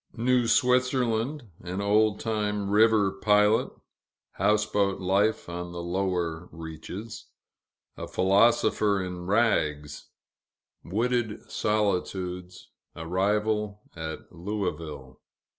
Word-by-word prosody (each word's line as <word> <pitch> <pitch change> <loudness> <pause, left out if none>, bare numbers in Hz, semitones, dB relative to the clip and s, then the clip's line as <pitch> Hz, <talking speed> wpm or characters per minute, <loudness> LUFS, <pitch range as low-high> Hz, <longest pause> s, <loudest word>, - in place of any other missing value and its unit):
New 125 +1 +2
Switzerland 125 +2 +2 0.2
An 90 +2 -5
old 105 +1 +2
time 105 -2 -2
river 105 -2 +4
pilot 105 +2 +3 0.6
Houseboat 105 -2 +1
life, 100 +4 +1
on 85 0 -6
the 85 0 -5
lower 90 -2 -2
reaches 85 +7 -8 0.7
A - - -6
philosopher 100 +1 +3
in 90 -1 -6
rags 75 -10 0 0.8
Wooded 115 +2 -1
solitudes 90 -3 -2 0.3
Arrival 105 +4 -1
at 80 -1 -7
Louisville. 80 -8 -5
100 Hz, 85 wpm, -27 LUFS, 90-110 Hz, 0.8 s, river